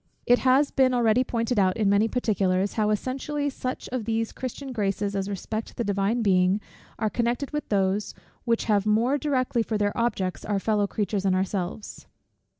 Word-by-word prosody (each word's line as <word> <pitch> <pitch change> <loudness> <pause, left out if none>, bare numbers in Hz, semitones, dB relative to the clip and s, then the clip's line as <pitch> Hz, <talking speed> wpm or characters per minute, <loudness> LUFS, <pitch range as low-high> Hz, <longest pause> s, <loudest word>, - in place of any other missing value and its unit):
It 245 0 +5
has 265 +2 +3
been 260 -2 +3
already 240 +1 +3
pointed 230 -2 -1
out 185 -2 +2
in 215 -2 +1
many 200 +2 +4
particulars, 200 -5 0
how 215 -1 +1
essentially 275 +6 -2
such 255 -1 -5
of 250 -4 -3
these 225 0 -1
Christian 260 +1 -6
graces 200 -3 -1
as 195 0 -2
respect 215 +3 -5
the 235 - 0
Divine 205 +3 0
Being 185 0 +3 0.4
are 220 - 0
connected 240 +5 -1
with 295 0 -4
those, 195 0 0 0.3
which 230 -1 +1
have 210 -1 +2
more 235 +7 +2
directly 255 -5 0
for 220 -1 -1
their 205 -1 0
objects 195 -6 -1
our 205 -1 -1
fellow 205 0 +1
creatures 205 -1 -2
and 190 -1 +2
ourselves. 190 +1 -3
215 Hz, 175 wpm, -26 LUFS, 200-245 Hz, 0.4 s, It